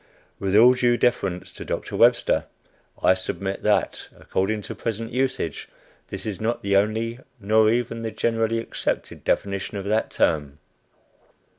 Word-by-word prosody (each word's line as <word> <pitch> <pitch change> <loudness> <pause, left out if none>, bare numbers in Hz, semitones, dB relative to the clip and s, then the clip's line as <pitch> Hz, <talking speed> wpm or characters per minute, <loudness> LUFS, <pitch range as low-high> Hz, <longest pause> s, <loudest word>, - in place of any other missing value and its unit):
With 95 0 0
all 120 +4 +8
due 120 -1 +2
deference 95 -8 0
to - - -7
Doctor - - -4
Webster, - - +4 0.6
I - - +6
submit 95 +1 -4
that, - - 0
according 105 +3 -1
to - - -6
present 115 0 -4
usage, 130 -8 -2 0.4
this - - -5
is 105 -3 -4
not 115 +2 -1
the 100 0 +1
only, 110 +4 +1 0.2
nor 110 +1 +4
even 115 0 -1
the 115 - -2
generally 115 0 0
accepted 115 - -3
definition 100 +1 -1
of 100 - -5
that 110 +2 +1
term. 75 -3 0
110 Hz, 145 wpm, -24 LUFS, 100-115 Hz, 0.6 s, all